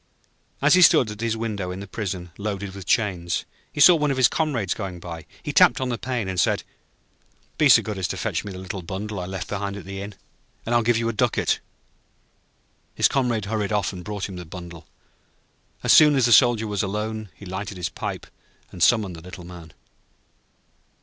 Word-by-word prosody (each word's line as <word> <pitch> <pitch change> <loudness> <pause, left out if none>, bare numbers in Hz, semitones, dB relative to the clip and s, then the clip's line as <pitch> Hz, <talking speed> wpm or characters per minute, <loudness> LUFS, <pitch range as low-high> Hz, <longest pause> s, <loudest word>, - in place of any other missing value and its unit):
As 145 - +5
he 185 - +6
stood 150 -10 +6
at 105 +1 -8
his 115 -1 -1
window 105 -5 -3
in 90 +1 -5
the 100 - -7
prison, 95 -4 -5
loaded 100 -2 -4
with 95 -2 -10
chains, 90 -7 0 0.3
he - - -8
saw 175 +5 +9
one 150 -2 +1
of 135 - -1
his 130 - +6
comrades 125 - -1
going 95 -4 -6
by. 85 -2 -8 0.2
He - - -4
tapped - - +5
on 130 -1 -2
the 120 - -2
pane, 120 -4 -3
and 95 -1 -2
said: - - +2 1.0
'Be 150 - +5
so 120 - +7
good 105 -3 -5
as 90 - -1
to - - -4
fetch - - -2
me 100 - -7
the 95 - -8
little 95 +1 -6
bundle 100 +4 -5
I 90 - -5
left 95 -2 -5
behind 100 0 -3
at 100 - -9
the 95 0 -6
inn, 100 0 -8 0.5
and 115 - -1
I 120 - +5
will - - -1
give 120 0 +2
you 115 0 -1
a 115 - -1
ducat.' 105 - +1 1.4
His - - +4
comrade 120 -6 0
hurried 105 -1 -2
off 105 -1 0
and 90 -1 -8
brought 105 0 -4
him 95 -2 -8
the 90 - -6
bundle. 85 -1 -10 1.0
As - - +5
soon 150 -2 +7
as 130 -3 +3
the 120 - +4
Soldier 115 +2 +5
was 105 -2 -2
alone, 105 +1 -3
he 100 - -12
lighted 95 +1 -5
his 90 - -2
pipe - - -5 0.5
and 90 - -10
summoned 105 -2 +3
the 80 - -11
Little 90 0 -10
Man. 85 -3 -11
100 Hz, 215 wpm, -23 LUFS, 95-115 Hz, 1.4 s, saw